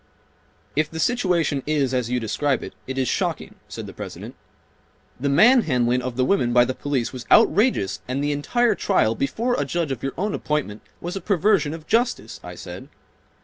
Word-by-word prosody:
"If 155 +1 +1
the 160 - -7
situation 180 - +1
is 145 -4 +1
as 125 -2 0
you 125 0 0
describe 125 +4 -1
it, - - -8
it 130 0 -5
is 130 -1 +1
shocking," - - -2 0.2
said - - -7
the - - -9
President'. - - -8 0.9
"The 140 +2 0
manhandling 140 - +4
of 125 -1 -4
the 130 0 +1
women 130 -9 +1
by 120 0 +6
the 130 - -2
police 135 -3 -2
was 125 -3 -8
outrageous 205 - +3
and 130 +3 -2
the 145 - 0
entire 225 +11 +1
trial 110 - +1
(before 225 - -1
a - - +1
judge 155 +1 -2
of 130 - -4
your 135 - -3
own 205 +4 -1
appointment) 145 -9 -2 0.2
was 175 +2 -4
a 195 - -4
perversion 185 -4 +2
of 160 -2 -11
justice," 235 +4 0
I - - -8
said. - - -9
145 Hz, 190 wpm, -23 LUFS, 130-185 Hz, 0.9 s, by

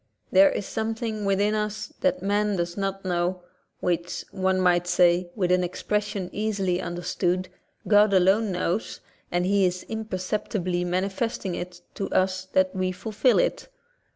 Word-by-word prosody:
There 290 0 +7
is 205 - -3
something 220 -1 -3
within 200 +2 +2
us 215 +7 -3
that 275 0 +1
man 205 +1 +1
does 175 -1 -2
not 195 -1 -3
know, 180 0 -1 0.4
which, 175 0 -2
one 190 -1 +1
might 175 -1 +3
say, 175 0 +3
with 180 -4 0
an 180 0 +3
expression 205 +1 -2
easily 195 -4 -1
understood, 180 +1 -1 0.4
God 210 0 +5
alone 195 +3 +3
knows, 180 +3 -2 0.3
and 175 +1 +1
He 200 +1 +3
is 180 0 0
imperceptibly 185 -3 -2
mani 185 +2 0
festing 200 -2 -3
it 175 0 -6
to 195 - -4
us 185 0 +1
that 190 0 +1
we 185 0 0
fulfil 220 +6 +1
it. - - 0
190 Hz, 150 wpm, -25 LUFS, 180-210 Hz, 0.4 s, There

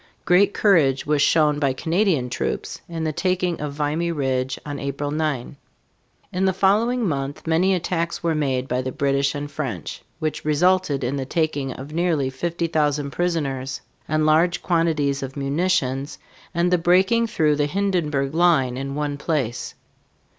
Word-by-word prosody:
Great 190 +3 +4
courage 155 -13 +3
was 150 -1 +1
shown 150 -1 +3
by 140 -3 +1
Canadian 165 -2 +1
troops 125 - -3
in 165 -1 -4
the 155 -1 -1
taking 180 -1 0
of 150 -1 -3
Vimy 155 +4 -1
Ridge 130 -4 -1
on 145 -1 -5
April 140 +1 -3
9. 150 -3 -2 0.8
In 185 +1 +1
the 190 - +2
following 215 +5 +2
month 140 -2 -3
many 175 +4 +3
attacks 170 -1 -2
were 165 -1 +1
made 135 -4 -1
by 125 0 0
the 130 0 -4
British 140 +1 0
and 145 0 -5
French, 120 - -5 0.2
which 155 -1 -3
resulted 155 -1 +2
in 130 +3 -1
the 135 - -3
taking 145 -4 -1
of 140 +3 -9
nearly 160 -6 +1
50,000 150 -2 -1
prisoners 140 -6 -2 0.3
and 155 0 +1
large 170 +3 +3
quantities 160 -5 +1
of 135 +1 -6
munitions, 140 -2 0 0.3
and 175 +1 +1
the 180 - +4
breaking 190 +7 +3
through 155 -8 +2
the 145 0 +1
Hindenburg 155 -7 0
line 160 -7 +3
in 135 +1 -4
one 145 -1 -2
place. 135 -6 -2
150 Hz, 155 wpm, -22 LUFS, 140-175 Hz, 0.8 s, Great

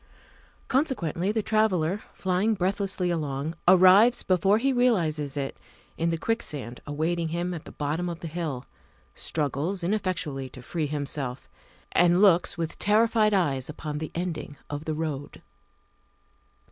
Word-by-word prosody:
Consequently 210 - 0
the 220 0 -1
traveller, 200 -4 +1
flying 190 +4 0
breathlessly 190 -1 -1
along, 150 -2 -2
arrives 190 +6 +7
before 190 +3 +3
he 270 +4 +1
realizes 160 - +1
it 135 -1 -3 0.4
in 165 +1 0
the 165 - 0
quicksand 150 - -3
awaiting 160 +3 -1
him 175 +2 -2
at 165 - -7
the - - -10
bottom 155 +4 -2
of 170 -1 -5
the 170 - -5
hill, 155 -6 -4 0.5
struggles 160 +5 -2
ineffectually 170 -9 -1
to 125 0 -12
free 155 +3 -2
himself, 140 -3 -3 0.4
and 175 0 +4
looks 185 -5 +4
with 165 -1 -4
terrified 215 +1 +3
eyes 140 -8 0
upon 150 -1 -5
the 155 - -4
ending 165 -4 -4
of 145 +1 -4
the 155 - -2
road. 150 -3 -5
170 Hz, 135 wpm, -26 LUFS, 150-195 Hz, 0.5 s, arrives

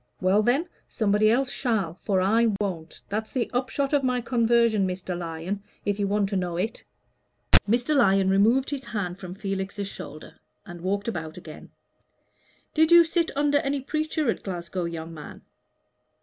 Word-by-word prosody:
Well 190 +3 +3
then, 265 - +1 0.2
somebody 215 -1 +2
else 255 +3 +2
shall, 215 - -1
for 190 +1 -1
I 225 +5 +3
won't. 175 -6 -4
That's 215 +2 -3
the 250 -3 -2
upshot 270 +3 -1
of 290 - +4
my 250 -1 +1
conversion, 235 -4 +2
Mr. 180 0 -4
Lyon, 170 +3 -4 0.2
if 205 0 -1
you 200 - +1
want 205 0 +1
to 200 - -2
know 180 -2 -1
it." 215 +6 -3 0.9
Mr. 245 +6 +2
Lyon 195 -7 +4
removed 225 +8 +3
his 275 -2 -3
hand 190 -6 -4
from 185 -1 -8
Felix's 195 0 -4
shoulder 155 -5 -10 0.3
and 175 -4 -10
walked 200 +3 -2
about 160 -7 -4
again. 160 -3 -11 1.0
"Did 315 +1 +3
you 340 0 +9
sit 335 0 0
under 290 0 +3
any 275 0 -1
preacher 310 +1 -2
at - - -6
Glasgow, 175 -1 -4
young 165 -1 -6
man?" 150 -2 -10
205 Hz, 165 wpm, -26 LUFS, 185-250 Hz, 1.0 s, you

